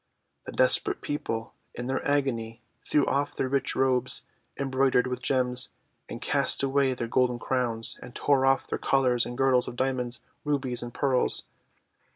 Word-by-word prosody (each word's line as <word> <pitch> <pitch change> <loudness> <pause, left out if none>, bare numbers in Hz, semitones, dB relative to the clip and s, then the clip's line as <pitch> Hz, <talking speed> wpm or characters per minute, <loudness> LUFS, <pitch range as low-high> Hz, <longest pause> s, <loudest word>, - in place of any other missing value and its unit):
The - - -4
desperate 460 -5 +2
people, 115 -6 -3 0.2
in 120 - -5
their 130 +1 -1
agony, 120 -6 -1 0.2
threw 145 -2 +2
off 140 +1 0
their 130 - 0
rich 135 0 0
robes 130 -1 +1 0.3
embroidered 135 -2 +2
with 125 0 -3
gems, 125 -1 +1 0.4
and - - -6
cast - - 0
away 135 -1 +2
their 120 -1 -3
golden 125 0 +2
crowns, 120 -2 -1
and 125 0 -11
tore 140 -2 +2
off 135 0 +3
their - - -3
collars 125 -3 +2
and 120 0 -6
girdles 130 -2 +3
of - - -6
Diamonds, 125 -1 -1 0.2
Rubies, 135 -4 0
and 120 - -6
Pearls. 130 -1 +1
130 Hz, 160 wpm, -27 LUFS, 125-135 Hz, 0.4 s, off